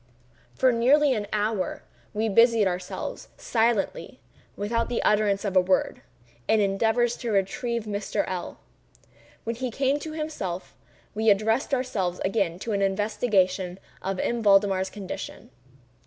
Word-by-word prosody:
For 260 -1 +4
nearly 265 +5 +4
an 210 -3 -3
hour, 210 -2 -1 0.3
we 215 +1 -1
busied 230 0 +5
ourselves, 180 0 -4
silently—without 230 - -2
the 240 - -1
utterance 210 -1 +2
of 195 -2 -2
a 185 - +7
word—in 120 - -1
endeavors 225 +4 +2
to 240 - -4
revive 220 +3 -1
Mr. 205 -1 -2
L—l. 180 -2 -5 0.9
When 230 +1 -3
he 255 0 -2
came 275 +4 0
to 310 +1 -6
himself, 300 - -5 0.4
we 220 +1 +2
addressed 220 +7 +2
ourselves 215 -9 -1
again 190 -4 0
to 230 - -3
an 200 -1 0
investigation 195 -2 +1 0.2
of 195 0 -3
M. 235 -1 -1
Valdemar's 195 -2 +4
condition. 190 -9 -7
210 Hz, 125 wpm, -26 LUFS, 195-235 Hz, 0.9 s, a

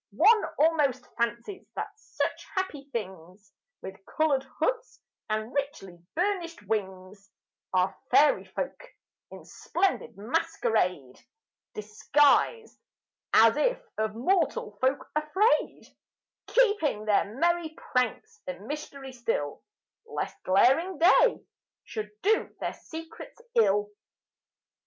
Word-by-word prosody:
One 435 +5 +6
almost 285 -5 +2
fancies 235 - -3
that 415 - -4
such 440 +4 -4
happy 300 -7 -3
things, 190 -2 -7 0.3
With 190 0 -9
coloured 305 -4 +1 0.2
hoods - - -2 0.3
and 215 +2 -2
richly 275 -11 -4 0.2
burnished 345 - -1
wings, 195 -1 -4 0.4
Are 185 0 +1
fairy 295 0 +4
folk, - - -5 0.5
in - - -12
splendid 390 - -2
masquerade 210 - -1 0.6
Disguised, 290 - +2 0.5
as 225 +2 +7
if - - +1 0.2
of 215 0 -2
mortal 280 - 0
folk 260 +2 +1
afraid, 340 +10 +1 0.6
Keeping 410 - +2
their 210 0 +1
merry 345 +1 +1
pranks 250 -8 -2
a 180 - -2
mystery 270 +5 -7
still, 230 - -2 0.5
Lest - - -4
glaring 270 - +3
day 375 +8 +4 0.4
should 215 -2 -5
do 435 +2 +2
their - - -3
secrets 325 +6 -10
ill. 210 - +3
265 Hz, 100 wpm, -28 LUFS, 210-335 Hz, 0.6 s, as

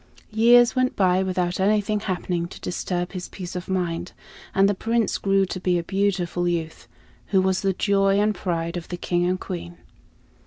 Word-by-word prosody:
Years 240 +3 +5
went 255 0 +1
by 185 -1 +3
without 180 -1 -1
anything 210 +1 +2
happening 180 -3 -2
to - - -11
disturb 175 0 -3
his 180 -2 -6
peace 180 -2 -8
of 180 +1 -6
mind, 175 -2 -2 0.4
and 195 0 +5
the 205 - +2
Prince 230 +3 0
grew 195 -1 +2
to 185 - -5
be 180 -1 +1
a 170 - -2
beautiful 180 -2 0
youth, 165 -2 -3 0.4
who 195 - +3
was 190 0 +1
the 195 -1 +1
joy 195 +1 +2
and 210 +1 +2
pride 170 -2 -3
of 170 - -7
the 175 - -5
King 175 0 0
and 185 +1 0
Queen. 85 - -6
185 Hz, 185 wpm, -24 LUFS, 175-200 Hz, 0.4 s, Years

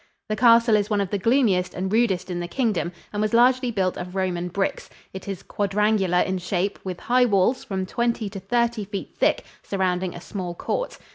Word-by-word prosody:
The 215 - 0
castle 230 0 +5
is 205 0 +1
one 210 -2 +1
of 195 -2 -2
the 205 - 0
gloomiest 215 -5 +2
and 190 +2 -2
rudest 190 -6 +1
in 175 - -2
the 175 - -3
Kingdom, 210 -7 -1 0.2
and 205 - -1
was 215 +1 +1
largely 250 +1 +4
built 190 -5 0
of 180 +1 -7
Roman 180 -2 -1
bricks. 195 +2 -2 0.2
It 190 +1 -8
is 195 -3 -5
quadrangular 200 -2 +1
in 190 0 -1
shape, 180 +2 -2
with 185 -2 -5
high 250 +1 +3
walls 210 +3 +2
from 190 -2 -3
twenty 235 +2 -1
to 195 - -6
thirty 235 +3 0
feet 200 0 -6
thick - - +2 0.2
surrounding 185 -2 -1
a - - -7
small 180 -1 -5
court. - - -3
200 Hz, 200 wpm, -24 LUFS, 185-230 Hz, 0.2 s, castle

